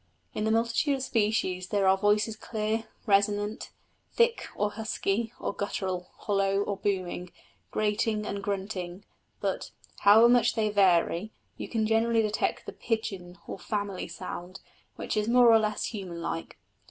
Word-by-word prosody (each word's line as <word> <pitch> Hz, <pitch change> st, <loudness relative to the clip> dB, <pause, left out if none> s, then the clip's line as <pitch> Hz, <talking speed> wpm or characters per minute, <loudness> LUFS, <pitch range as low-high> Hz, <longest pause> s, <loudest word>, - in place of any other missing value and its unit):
In 210 Hz, -, -2 dB
the -, -, +1 dB
multitude 230 Hz, +6 st, +2 dB
of 265 Hz, -, -4 dB
species 210 Hz, -6 st, 0 dB
there 200 Hz, -1 st, +1 dB
are 190 Hz, -, +6 dB
voices 210 Hz, +2 st, +2 dB
clear, 220 Hz, 0 st, -2 dB, 0.2 s
resonant, 205 Hz, +1 st, +1 dB, 0.4 s
thick, 470 Hz, 0 st, +2 dB
or 205 Hz, 0 st, 0 dB
husky, 220 Hz, 0 st, -2 dB
or -, -, -3 dB
guttural, 185 Hz, -3 st, -3 dB
hollow 195 Hz, -1 st, +1 dB
or 205 Hz, -, -2 dB
booming, 185 Hz, -3 st, -2 dB, 0.4 s
grating 210 Hz, 0 st, 0 dB
and 200 Hz, -1 st, -3 dB
grunting; 195 Hz, -2 st, -4 dB, 0.4 s
but, -, -, -2 dB, 0.3 s
however 220 Hz, +3 st, +7 dB
much 240 Hz, -1 st, +4 dB
they 220 Hz, -2 st, +1 dB
vary, 185 Hz, -1 st, +3 dB, 0.3 s
you -, -, -7 dB
can 225 Hz, -2 st, 0 dB
generally 225 Hz, +1 st, +2 dB
detect 215 Hz, 0 st, -1 dB
the -, -, -7 dB
pigeon 195 Hz, -6 st, -3 dB
or -, -, -7 dB
family 200 Hz, -1 st, -3 dB
sound, 175 Hz, +3 st, -7 dB, 0.4 s
which -, -, -4 dB
is 210 Hz, 0 st, 0 dB
more 240 Hz, 0 st, +6 dB
or 225 Hz, -, +7 dB
less 215 Hz, -1 st, -1 dB
human 185 Hz, -5 st, -6 dB
like. 165 Hz, 0 st, -5 dB
210 Hz, 150 wpm, -28 LUFS, 195-220 Hz, 0.4 s, however